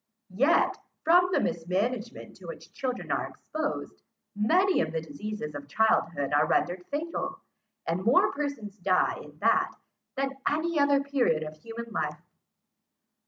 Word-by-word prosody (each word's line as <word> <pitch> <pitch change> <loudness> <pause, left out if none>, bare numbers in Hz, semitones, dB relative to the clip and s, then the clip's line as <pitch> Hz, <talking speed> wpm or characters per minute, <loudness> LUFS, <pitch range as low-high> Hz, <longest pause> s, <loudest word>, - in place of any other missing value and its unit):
Yet, 275 - +3 0.3
from 355 +3 +6
the - - +3
mismanagement 210 +8 -2
to - - -12
which - - -9
children 255 -2 -3
are - - 0
exposed, 310 -1 -4 0.3
many 360 - +3
of 160 - -1
the 160 - -1
diseases 160 +2 -6
of 145 -1 -7
childhood 150 -6 +2
are 145 - +4
rendered 180 +1 0
fatal, 315 +4 -3 0.5
and 175 +3 -1
more 235 +6 +5
persons 270 -9 -4
die 185 0 +2
in - - -13
that, - - +3 0.4
than 270 0 0
in 270 - -13
any 315 +2 0
other 285 -1 +4
period 255 - +1
of 155 0 -7
human 230 +7 -8
life. - - -2
230 Hz, 145 wpm, -28 LUFS, 175-285 Hz, 0.5 s, from